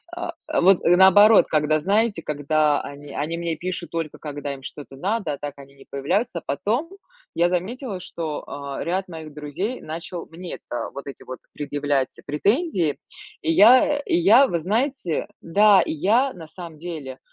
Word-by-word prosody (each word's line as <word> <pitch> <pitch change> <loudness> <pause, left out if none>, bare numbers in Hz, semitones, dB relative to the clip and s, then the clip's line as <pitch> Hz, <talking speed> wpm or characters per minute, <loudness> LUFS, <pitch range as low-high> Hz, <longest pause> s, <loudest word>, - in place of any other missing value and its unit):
а, 345 -1 -4
а, - - 0
вот 190 +1 +6
наоборот, 190 +4 +7
когда 155 0 +2
знаете, 200 +1 +1
когда 150 0 +1
они 145 0 -10
они 160 +3 -2
мне 170 -1 -2
пишут 175 +1 -5
только 165 -3 -4
когда 145 -1 -5
им 135 - -11
что-то 140 0 -9
надо, 195 0 -1
а 140 - -5
так 145 0 -6
они 140 0 -14
не 135 - -17
появляются. 170 - -1
Потом 220 - -1 0.5
я 170 +1 +3
заметила, 195 +4 -3
что, 165 -4 -5
а, 140 -1 -5
ряд 190 +3 -2
моих 160 -3 -9
друзей 150 - -4
начал 165 +2 -6
мне, 170 +2 -7
это, 120 -1 -6
вот 140 - -7
эти 140 - -9
вот 130 - -7 0.2
предъявлять 145 -2 -1
претензии. 185 - 0 0.4
И 160 - 0
я, 255 - +6
и 285 - -1
я, 215 +11 +6
вы 170 - -1
знаете, 225 - -1
да, 200 +3 +5
и - - -2
я, 225 - +2
на 165 -3 -11
самом 170 -1 -10
деле, 155 -7 -7
170 Hz, 170 wpm, -23 LUFS, 145-200 Hz, 0.5 s, наоборот